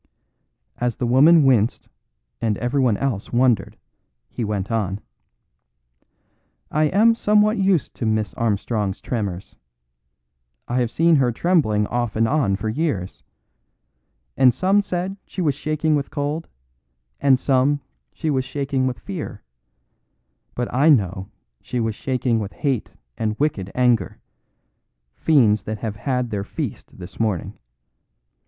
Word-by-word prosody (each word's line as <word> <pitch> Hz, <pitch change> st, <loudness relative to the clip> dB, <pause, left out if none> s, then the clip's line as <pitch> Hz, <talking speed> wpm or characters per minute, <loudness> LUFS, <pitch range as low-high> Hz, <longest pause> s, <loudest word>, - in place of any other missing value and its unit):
As 120 Hz, -2 st, 0 dB
the 125 Hz, -, -2 dB
woman 145 Hz, +7 st, +6 dB
winced 120 Hz, -4 st, +2 dB, 0.5 s
and 110 Hz, -3 st, 0 dB
everyone 125 Hz, -3 st, +1 dB
else 125 Hz, -8 st, -3 dB
wondered, 120 Hz, -5 st, +1 dB, 0.5 s
he 120 Hz, -, -4 dB
went 105 Hz, -1 st, -3 dB
on: 100 Hz, -3 st, -1 dB, 1.7 s
"I 155 Hz, +1 st, +2 dB
am 210 Hz, +9 st, +4 dB
somewhat 210 Hz, -1 st, +2 dB
used 190 Hz, -6 st, +1 dB
to 115 Hz, -, -2 dB
Miss 110 Hz, -3 st, 0 dB
Armstrong's 105 Hz, -2 st, -1 dB
tremors. 100 Hz, -6 st, -4 dB, 1.1 s
I 125 Hz, +1 st, 0 dB
have 120 Hz, -2 st, +1 dB
seen 165 Hz, +5 st, +3 dB
her 130 Hz, -3 st, +2 dB
trembling 115 Hz, -, +2 dB
off 120 Hz, -1 st, -2 dB
and 115 Hz, +1 st, +2 dB
on 130 Hz, -8 st, +1 dB
for 105 Hz, +3 st, -4 dB
years. 110 Hz, -, -2 dB, 1.1 s
And 130 Hz, -2 st, +5 dB
some 195 Hz, +2 st, +3 dB
said 190 Hz, 0 st, -3 dB
she -, -, -8 dB
was 155 Hz, -6 st, +2 dB
shaking 155 Hz, +2 st, 0 dB
with 140 Hz, -1 st, -2 dB
cold 150 Hz, +3 st, -3 dB, 0.7 s
and 135 Hz, -2 st, +4 dB
some 135 Hz, +2 st, +2 dB, 0.3 s
she 160 Hz, -2 st, -2 dB
was 130 Hz, -2 st, +1 dB
shaking 135 Hz, 0 st, -1 dB
with 125 Hz, -, -3 dB
fear, 165 Hz, -, -7 dB, 1.1 s
but 120 Hz, 0 st, -2 dB
I 140 Hz, +6 st, +4 dB
know 95 Hz, -, +2 dB, 0.3 s
she 125 Hz, -, -4 dB
was 115 Hz, -1 st, 0 dB
shaking 125 Hz, -1 st, -1 dB
with 100 Hz, -2 st, -5 dB
hate 135 Hz, -6 st, -2 dB, 0.2 s
and 110 Hz, -1 st, -1 dB
wicked 105 Hz, -11 st, -1 dB
anger 125 Hz, -6 st, +2 dB, 1.0 s
fiends 115 Hz, -10 st, +3 dB
that 110 Hz, 0 st, -3 dB
have 105 Hz, -1 st, -4 dB
had 125 Hz, 0 st, -2 dB
their 100 Hz, -2 st, -2 dB
feast -, -, -6 dB
this 90 Hz, -1 st, -11 dB
morning. 105 Hz, -7 st, -1 dB
125 Hz, 135 wpm, -22 LUFS, 110-150 Hz, 1.7 s, woman